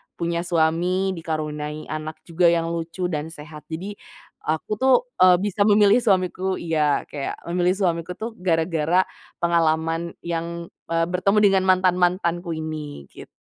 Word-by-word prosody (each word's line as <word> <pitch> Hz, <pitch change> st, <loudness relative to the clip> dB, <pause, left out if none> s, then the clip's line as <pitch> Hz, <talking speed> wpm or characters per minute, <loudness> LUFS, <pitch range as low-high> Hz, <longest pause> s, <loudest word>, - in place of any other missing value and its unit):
punya 170 Hz, 0 st, -2 dB
suami, 175 Hz, +3 st, +1 dB
dikaruniai 155 Hz, -1 st, -4 dB
anak 155 Hz, 0 st, -5 dB
juga 175 Hz, +1 st, 0 dB
yang 165 Hz, -1 st, +2 dB
lucu 170 Hz, +2 st, -4 dB
dan 150 Hz, -1 st, -2 dB
sehat. 150 Hz, -1 st, -11 dB
Jadi, 190 Hz, +6 st, -6 dB, 0.5 s
aku, 160 Hz, +7 st, -1 dB
tuh, 265 Hz, 0 st, +5 dB, 0.2 s
eee, 185 Hz, -1 st, +7 dB
bisa 205 Hz, 0 st, +1 dB
memilih 205 Hz, 0 st, +6 dB
suamiku 190 Hz, -3 st, +1 dB
iya, 155 Hz, -4 st, +1 dB
kayak 140 Hz, -2 st, -4 dB, 0.2 s
memilih 180 Hz, +1 st, +2 dB
suamiku, 180 Hz, -2 st, -1 dB
tuh, 225 Hz, +4 st, -5 dB
gara-gara 165 Hz, -1 st, +2 dB, 0.4 s
pengalaman 165 Hz, 0 st, +1 dB
yang, 170 Hz, 0 st, -4 dB, 0.2 s
eee, 165 Hz, 0 st, +1 dB
bertemu 185 Hz, +3 st, +1 dB
dengan 190 Hz, -1 st, +2 dB
mantan-mantanku 180 Hz, -2 st, +2 dB
ini 155 Hz, -, -6 dB
gitu. -, -, -12 dB
170 Hz, 135 wpm, -23 LUFS, 160-185 Hz, 0.5 s, eee